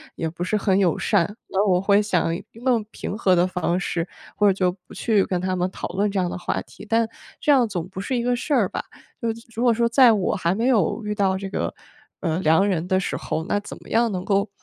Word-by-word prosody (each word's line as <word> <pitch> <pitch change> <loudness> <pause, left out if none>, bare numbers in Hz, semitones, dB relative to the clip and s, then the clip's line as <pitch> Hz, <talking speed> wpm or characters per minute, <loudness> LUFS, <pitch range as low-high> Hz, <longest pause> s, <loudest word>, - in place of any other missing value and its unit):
也 165 - -2
不 170 +2 -5
是 210 +4 0
很 195 -1 +2
友 175 -5 +2
善。 170 +5 +1
那 195 +1 +1
我 180 -1 +4
会 200 +2 +4
想 180 -5 +1 0.2
用 235 -1 0
平 205 - -5
和 190 -4 +3
的 175 +1 +4
方 180 -1 -1
式， 170 -1 -2 0.3
或 210 - +3
者 195 - +5
就 185 -1 +1 0.2
不 - - -12
去 210 -5 +2
跟 180 -2 -1
他 185 0 -1
们 180 0 0
讨 - - -6
论 200 +3 0
这 195 - -1
样 180 - +1
的 - - -4
话 - - -2
题， - - -14
但 230 0 +3 0.3
这 295 - +2
样 255 -5 +5
总 180 -3 -3
不 190 0 -7
是 255 +5 -2
一 235 - -1
个 245 0 +1
事 255 +5 -6
儿 215 -7 +3
吧。 - - -4 0.4
就 230 -2 0
是 230 +1 -10
如 230 - -2
果 245 - +5
说 235 +1 +2
在 240 0 +6
我 200 -2 0
还 180 -2 0
没 230 +4 0
有 225 -3 +2
遇 210 - -1
到 195 -2 +1
这 195 - -5
个， - - -2 0.5
呃， 165 -1 0
良 185 +3 +4
人 175 -3 -1
的 185 -1 +2
时 190 - -2
候， 160 - -3
那 205 - 0
怎 - - -9
么 - - -14
样 230 0 +2
能 185 -1 -4
够 200 0 +1
195 Hz, 280 characters per minute, -23 LUFS, 180-225 Hz, 0.5 s, 在